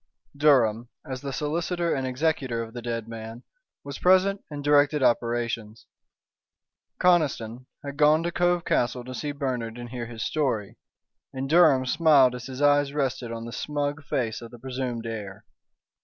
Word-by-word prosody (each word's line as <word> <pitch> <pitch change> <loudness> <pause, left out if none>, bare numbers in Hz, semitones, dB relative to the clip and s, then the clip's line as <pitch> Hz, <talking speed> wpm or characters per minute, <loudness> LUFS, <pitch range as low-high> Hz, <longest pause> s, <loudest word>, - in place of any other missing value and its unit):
Durham, 120 -6 +3 0.2
as 130 -3 -6
the 140 - -4
solicitor 170 +5 -1
and 135 -1 -2
executor 130 -3 -1
of 115 0 -10
the 120 - -6
dead 115 -1 -4
man, 115 +1 -8 0.4
was 140 -1 -7
present 190 +2 +3
and 145 -2 -6
directed 145 0 +3
operations. 115 -2 -1 1.1
Conniston 130 -9 +1 0.2
had 140 0 -6
gone 155 +2 +4
to 170 - -1
Cove 175 0 +1
Castle 125 0 0
to 130 - -7
see 145 +3 -3
Bernard 125 -5 -3
and 120 0 -7
hear 120 -1 -5
his 115 -1 -6
story; 125 -10 -2 0.5
and 130 +1 -3
Durham 155 -4 +5
smiled 145 -3 +5
as 125 0 -7
his 130 +2 -4
eyes 145 -1 +3
rested 130 -4 -2
on 115 0 -5
the 115 - -7
smug 145 +1 -3
face 120 -6 -2
of 115 - -9
the 120 - -12
presumed 125 -2 -4
heir. 105 -2 -6
130 Hz, 160 wpm, -26 LUFS, 115-150 Hz, 1.1 s, Durham